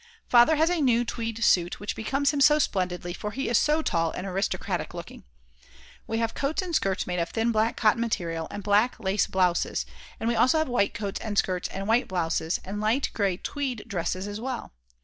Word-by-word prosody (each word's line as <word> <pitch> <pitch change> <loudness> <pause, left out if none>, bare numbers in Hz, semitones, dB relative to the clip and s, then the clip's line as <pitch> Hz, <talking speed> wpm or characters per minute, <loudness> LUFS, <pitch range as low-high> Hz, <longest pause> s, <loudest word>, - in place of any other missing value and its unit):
Father 240 +6 +6
has 320 +3 +3
a 350 -3 0
new 240 -3 +3
tweed 230 -1 -3
suit 175 -3 +3
which 205 - -4
becomes 275 +6 0
him 290 -2 -1
splendidly 185 -12 +2
for 210 - -5
he 270 +6 -3
is 235 - +4
so 305 +1 +2
tall 165 - +1
and 180 - -5
aristocratic 195 +1 -2
looking. - - -9 0.8
We 225 - -2
have 230 0 -1
coats 305 +7 -1
and 355 -2 -5
skirts 195 - +1
made 180 0 -2
of 170 0 -1
thin 225 +1 0
black 220 +1 +1
cotton 220 0 +3
material 170 -8 -2
and 205 - -7
black 210 +5 +2
lace 195 -1 +1
blouses, 180 - +1 0.3
and 225 - -2
we 235 - +2
also 255 +7 +4
have 315 - +1
white 245 -5 +1
coats 205 -3 -3
and 210 -2 -4
skirts 180 -2 +1
and 195 +1 -5
white 230 +3 +3
blouses, 165 -2 -1
and 205 +2 -4
light 225 +6 +1
grey 195 -4 0
tweed 265 -1 -4
dresses 185 -1 -2
as 205 +1 -6
well. 255 - -5
215 Hz, 205 wpm, -26 LUFS, 190-245 Hz, 0.8 s, Father